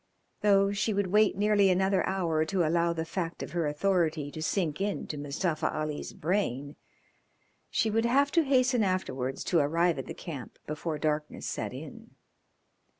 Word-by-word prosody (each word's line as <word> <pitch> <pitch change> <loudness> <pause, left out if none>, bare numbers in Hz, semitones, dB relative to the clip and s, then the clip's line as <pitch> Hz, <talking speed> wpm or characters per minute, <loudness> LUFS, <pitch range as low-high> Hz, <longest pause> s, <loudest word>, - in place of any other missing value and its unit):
Though 200 -1 +4
she 205 +1 0
would 200 -2 0
wait 210 -1 +4
nearly 205 -1 +4
another 190 +1 +2
hour 170 -5 +1
to 175 +1 0
allow 170 +1 +2
the 165 -1 -3
fact 165 0 -4
of - - -7
her 170 -3 0
authority 155 -2 0
to 155 - -7
sink 160 0 -1
into 200 -6 -2
Mustafa 155 +2 -1
Ali's 155 -1 -4
brain 145 -6 -1 0.9
she 220 - +1
would 225 +2 +1
have 280 +4 +3
to 335 - +4
hasten 255 -3 +3
afterwards 135 -9 -2
to 170 - +2
arrive 165 +2 +2
at 135 - -6
the - - -6
camp 145 -8 -8
before 155 +1 -3
darkness 150 0 -2
set - - -3
in. - - -10
170 Hz, 160 wpm, -29 LUFS, 155-200 Hz, 0.9 s, Though